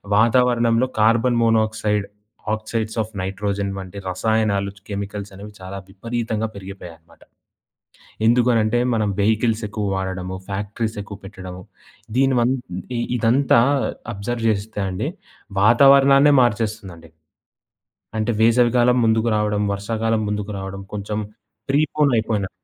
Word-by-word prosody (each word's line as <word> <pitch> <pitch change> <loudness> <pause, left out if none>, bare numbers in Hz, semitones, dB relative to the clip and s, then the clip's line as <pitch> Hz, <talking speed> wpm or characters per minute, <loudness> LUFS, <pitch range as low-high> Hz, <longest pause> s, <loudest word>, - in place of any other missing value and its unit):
వాతావరణంలో 120 +1 +3
carbon 115 +2 +3
monoxide, 110 -2 +1 0.5
oxide 110 0 -3
of 110 0 -6
nitrogen 100 +1 -2
వంటి 95 +1 -8
రసాయనాలు 100 +1 0
చ్ - - -19
కెమికల్సనేవి 100 0 -6
చాలా 95 +1 -7
విపరీతంగా 110 +2 -3
పెరిగిపోయాయనమాట. 90 -4 -11 1.1
ఎందుకు 120 +1 +4
అనంటే, 110 +2 +2
మనం 105 -2 +1
వెహికిల్సెక్కువ 110 -1 0
వాడడము, 95 -1 -4
ఫ్యాక్టరీసెక్కువ 105 +1 -4
పెట్టడము, 95 -2 -9 0.6
దీనిమం 130 -2 +3 0.7
ఇదంతా 120 +1 +4 0.5
అబ్జర్వ్ 115 +3 -3
చేస్తే 105 0 -3
అండి, 90 - -3 0.5
వాతావరణాన్నే 140 +4 +6
మార్చేస్తుందండి. 105 -8 -2 1.1
అంటే, 110 +2 0
వేసవి 120 +1 +4
కాలం 125 +1 +4
ముందుకు 110 +1 +2
రావడం, 105 -1 0
వర్షాకాలం 110 +2 -1
ముందుకు 105 0 -3
రావడం, 95 0 -6
కొంచం 105 +1 -3 0.5
ప్రీపోనయిపోయినంత. 125 -9 +1
110 Hz, 100 wpm, -21 LUFS, 100-115 Hz, 1.1 s, వాతావరణాన్నే